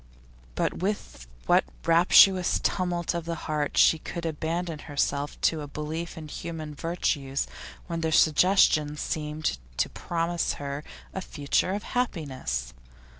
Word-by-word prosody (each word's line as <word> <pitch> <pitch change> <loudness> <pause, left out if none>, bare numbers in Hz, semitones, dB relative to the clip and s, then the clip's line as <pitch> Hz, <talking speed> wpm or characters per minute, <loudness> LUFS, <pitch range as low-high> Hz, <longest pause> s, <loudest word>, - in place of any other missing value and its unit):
But - - -1
with 185 - -3 0.2
what - - +5 0.2
rapturous 180 +2 +6
tumult 175 -2 0
of 170 -1 -3
the 170 0 -2
heart 150 -2 -1
she 160 - +6
could 170 +2 -6
abandon 165 +1 -2
herself 145 0 -1
to 160 -2 +2
a 145 - -6
belief 155 +4 -5
in 155 -1 -7
human 155 0 -6
virtues 145 -4 -1 0.4
when 170 -2 -3
their 160 -1 0
suggestion 155 -2 +4
seemed 150 - -2 0.2
to - - +1
promise 170 0 -1
her 140 +1 -5 0.3
a 190 - -3
future 150 +3 0
of 205 +1 -3
happiness! 135 - -2
160 Hz, 130 wpm, -27 LUFS, 150-170 Hz, 0.4 s, rapturous